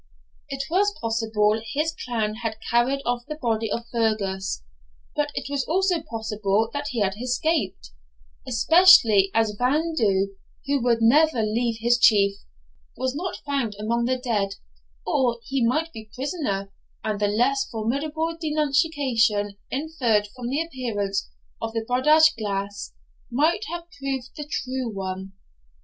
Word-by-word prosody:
It 275 0 -3
was 405 +4 +2
possible 225 -1 +1
his 310 +3 0
clan 225 -7 -2
had 220 -2 -3
carried 255 +4 +2
off 245 0 -1
the 305 - -4
body 225 -4 -1
of 235 +2 -2
Fergus; 200 - -1 0.5
but 295 0 0
it - - -3
was 280 -1 -1
also 360 0 +1
possible 220 -5 -1 0.2
he 240 -5 -2
had 195 0 0
escaped, 250 - -1 0.6
especially 240 - +6
as 220 -2 +2
Evan 305 +6 +1
Dhu, 200 -6 +2 0.4
who 280 -1 +1
would 235 -1 +2
never 285 0 +4
leave 225 +2 0
his 240 +1 +3
Chief, 200 -3 +5 0.6
was 260 0 -1
not 360 +6 -5
found 270 -7 -1
among 235 +3 0
the 255 +1 +1
dead; 210 -6 -1 0.5
or 245 -3 +1
he 270 -2 -1
might 310 +8 +1
be 220 -1 -10
prisoner, 255 - -3 0.3
and 215 -2 -2
the 205 - +2
less 260 +6 +1
formidable 295 +9 -2
denunciation 280 -9 +1
inferred 255 -8 0
from 245 -1 -5
the 285 +5 0
appearance 225 - -3 0.3
of 225 - -3
the 225 -1 -2
Bodach 305 +5 +5
Glas 200 -1 -3 0.4
might 315 - +1
have 345 +1 -4 0.2
proved 270 -2 -3
the 295 -1 -6
true 255 -3 -2
one. 190 -1 -5
240 Hz, 140 wpm, -24 LUFS, 215-285 Hz, 0.6 s, especially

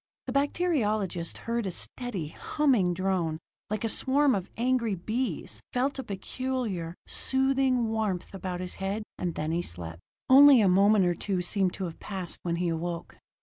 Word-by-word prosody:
The 255 - -4
bacteriologist 215 - 0
heard 230 -2 -1
a - - -2
steady, 170 - -5
humming 225 - +1
drone, 180 -4 0 0.3
like 215 0 -2
a - - +2
swarm 275 +4 +3
of 190 -3 -2
angry 235 -3 +1
bees 225 +8 -3
felt 265 +2 0
a - - -2
peculiar, 205 -4 -3
soothing 265 -3 +1
warmth 215 -6 -2
about 185 -2 -4
his 180 - -3
head; 200 +3 -1 0.2
and 175 -2 -2
then 155 +1 -2
he 170 +1 +1
slept. 85 - -7 0.3
Only 275 0 +9
a 205 - +4
moment 195 +2 +5
or 175 - +2
two 180 +1 -2
seemed 185 0 +1
to 195 - -5
have 165 -2 -7
passed 185 -5 -5
when 170 -1 -1
he 175 0 0
awoke. 170 +1 -4
200 Hz, 165 wpm, -28 LUFS, 175-255 Hz, 0.3 s, Only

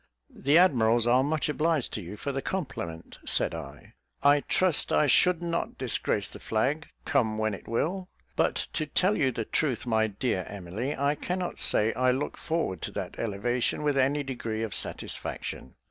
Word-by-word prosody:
"The 145 +4 +3
admirals 120 -10 +4
are 125 +2 +5
much 150 +2 0
obliged 155 -2 0
to 105 - -3
you 95 +4 -8
for 140 - -3
the 135 0 -2
compliment," 105 - -5
said - - +2
I. - - -9 0.3
"I 145 +1 +6
trust 180 +2 +1
I - - +4
should 175 +5 +4
not 170 0 -2
disgrace - - +1
the - - -11
flag, 140 +8 0 0.2
come 120 -8 +1
when 110 -1 0
it 100 - -9
will; 180 - -1 0.3
but - - +2 0.2
to 155 - -1
tell 185 +7 +2
you 135 -7 +2
the 115 -2 -3
truth, 130 -3 0
my 110 -2 +2
dear 105 -2 -1
Emily, 100 +8 -4
I 140 +1 +2
cannot, 180 +3 -3
say 110 +2 +3
I 130 +2 +2
look 130 +3 -1
forward 160 - -2
to - - -3
that - - -5
elevation, 115 +6 -1
with 145 -1 +2
any 140 +2 +2
degree 115 -5 -3
of 110 -4 -3
satisfaction. 65 - -4
130 Hz, 175 wpm, -28 LUFS, 110-150 Hz, 0.3 s, I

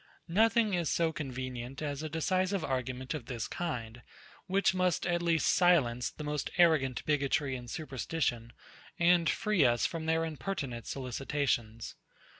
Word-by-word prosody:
Nothing 225 +1 +4
is 175 -4 0
so 165 -1 +1
convenient 130 -2 -5
as 145 -2 -3
a 155 - -4
decisive 185 +4 0
argument 130 0 -3
of 140 -6 -6
this 120 -4 -4
kind, 120 -9 -4 0.5
which 195 +1 +2
must 185 -2 +1
at 175 0 +1
least 165 -2 +2
silence 135 -10 +3
the 150 - -9
most 150 -1 -2
arrogant 155 -8 +3
bigotry 140 -2 +1
and 120 -1 -8
superstition, 130 -4 -2 0.5
and 170 -2 +4
free 210 -7 +2
us 120 -2 +3
from 160 -1 -3
their 160 0 +2
impertinent 140 - -4
solicitations. 125 -3 -2
150 Hz, 140 wpm, -31 LUFS, 125-170 Hz, 0.5 s, Nothing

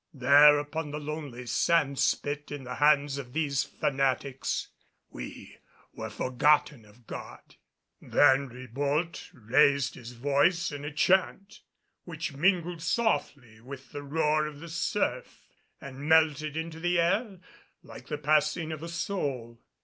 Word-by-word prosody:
There, 145 +3 +7
upon 150 +1 -4
the 150 +1 -5
lonely 145 -5 -6
sand 140 +1 +1
spit 145 +1 -1
in 145 -2 -6
the 125 - -6
hands 145 -1 +3
of 125 -3 -9
these 145 -3 0
fanatics, 135 -1 -2 0.4
we - - -10 0.3
were - - -6
forgotten 135 -1 +1
of 110 +3 -21
God. - - -10 0.4
Then 140 -1 +3
Ribault 140 +7 -3
raised 135 +3 +2
his 120 -1 -10
voice 145 +8 +1
in 145 -1 -7
a 150 - -4
chant 190 +5 +1 0.4
which 160 -3 -6
mingled 175 +2 +1
softly 140 - -1
with 130 0 -11
the 145 - -6
roar 150 +1 0
of 150 -1 -9
the 170 +2 -9
surf 165 - -2 0.3
and 140 +2 -8
melted 155 -1 +3
into 160 0 -5
the 175 +1 +1
air 195 +4 0 0.5
like - - -12
the 150 - -3
passing 150 +2 +1
of 155 -1 -6
a 165 - -6
soul. 135 -10 -4
145 Hz, 135 wpm, -28 LUFS, 135-160 Hz, 0.5 s, There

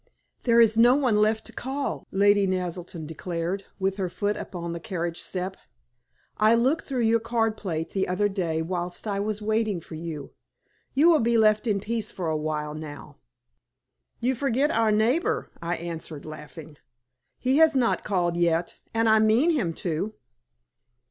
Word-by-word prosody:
"There 235 -1 +5
is 225 -1 +5
no 240 +2 +7
one 255 -7 +2
left 215 +1 +2
to - - -10
call," 275 +2 -4
Lady 200 0 +4
Naselton 180 -3 -3
declared, 170 +4 -4
with 195 0 -1
her 190 -3 -1
foot 205 +3 -1
upon 170 -4 -5
the 170 - -5
carriage 170 -1 -4
step. 185 +1 -3 0.8
"I 215 +2 +5
looked 260 +7 +1
through 255 -4 -1
your 225 +1 +4
card 225 -1 0
plate 165 -6 -3
the 190 -1 -1
other 190 +3 +1
day 170 -5 -1
whilst 175 +3 -4
I 200 -1 -1
was 210 +1 -2
waiting 215 -3 0
for 165 - -13
you. 155 -3 -6 0.6
You 295 +5 +5
will 320 - +5
be 235 -1 +2
left 215 +1 +3
in 205 -2 +2
peace 220 +1 -3
for 180 - -5
a - - 0
little 155 0 -2
while 150 -1 -2
now." 150 -2 -9 1.0
"You 250 +2 +1
forget 275 +3 +1
our 225 -5 +2
neighbor," 230 +10 +1
I 170 +1 -1
answered, 165 -3 -6
laughing. 155 0 -10 0.6
"He 260 +2 +1
has 320 -2 +5
not 250 -3 +2
called 175 -4 0
yet, 170 0 0 0.2
and 225 0 +3
I 220 0 +6
mean 225 +10 +4
him 235 - 0
to." 185 +5 -3
200 Hz, 170 wpm, -26 LUFS, 170-230 Hz, 1.0 s, no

